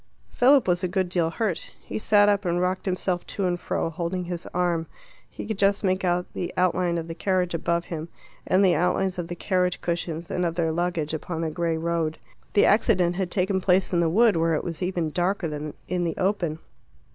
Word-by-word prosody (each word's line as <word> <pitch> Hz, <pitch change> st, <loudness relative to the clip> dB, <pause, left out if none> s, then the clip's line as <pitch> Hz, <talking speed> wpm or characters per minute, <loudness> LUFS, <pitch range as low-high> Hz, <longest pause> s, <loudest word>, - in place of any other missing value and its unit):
Philip 265 Hz, 0 st, +4 dB
was 175 Hz, +1 st, +1 dB
a -, -, +2 dB
good 185 Hz, 0 st, -1 dB
deal 175 Hz, -2 st, +1 dB
hurt. 185 Hz, -1 st, -3 dB
He -, -, -5 dB
sat 205 Hz, -1 st, +4 dB
up 205 Hz, -1 st, +2 dB
and 175 Hz, -1 st, 0 dB
rocked 185 Hz, +2 st, -1 dB
himself 180 Hz, -1 st, -1 dB
to 200 Hz, -, -2 dB
and 175 Hz, -1 st, 0 dB
fro, 165 Hz, -, -2 dB
holding 175 Hz, +3 st, -3 dB
his 175 Hz, -1 st, -5 dB
arm. 170 Hz, -2 st, 0 dB, 0.4 s
He -, -, -7 dB
could 220 Hz, -3 st, -4 dB
just 200 Hz, +1 st, +2 dB
make 185 Hz, 0 st, +1 dB
out 180 Hz, 0 st, +1 dB
the 175 Hz, -, -3 dB
outline 180 Hz, -1 st, +2 dB
of 165 Hz, -1 st, -4 dB
the 165 Hz, -, -5 dB
carriage 180 Hz, 0 st, 0 dB
above 170 Hz, +1 st, 0 dB
him, 165 Hz, 0 st, -6 dB, 0.4 s
and 190 Hz, +2 st, +4 dB
the 180 Hz, -, +5 dB
outlines 180 Hz, +1 st, +1 dB
of 170 Hz, -, -3 dB
the 175 Hz, -, -5 dB
carriage 180 Hz, -1 st, 0 dB
cushions 170 Hz, -1 st, -3 dB
and 180 Hz, -, 0 dB
of 170 Hz, -1 st, -1 dB
their 165 Hz, -2 st, +1 dB
luggage 165 Hz, -2 st, -1 dB
upon 160 Hz, +1 st, -4 dB
the 160 Hz, -1 st, -1 dB
grey 165 Hz, 0 st, -1 dB
road. 165 Hz, -1 st, -1 dB, 0.4 s
The 205 Hz, -, +5 dB
accident 185 Hz, -5 st, +3 dB
had 190 Hz, -2 st, -1 dB
taken 190 Hz, +1 st, 0 dB
place 185 Hz, 0 st, +2 dB
in 175 Hz, -, +3 dB
the 170 Hz, -1 st, +2 dB
wood, 220 Hz, +3 st, +4 dB
where 165 Hz, 0 st, +2 dB
it -, -, -2 dB
was 165 Hz, -3 st, -5 dB
even 180 Hz, -3 st, -1 dB
darker 180 Hz, +2 st, 0 dB
than 150 Hz, -1 st, -5 dB
in 180 Hz, 0 st, -1 dB
the 165 Hz, -2 st, -2 dB
open. 185 Hz, -5 st, 0 dB
175 Hz, 215 wpm, -25 LUFS, 170-185 Hz, 0.4 s, the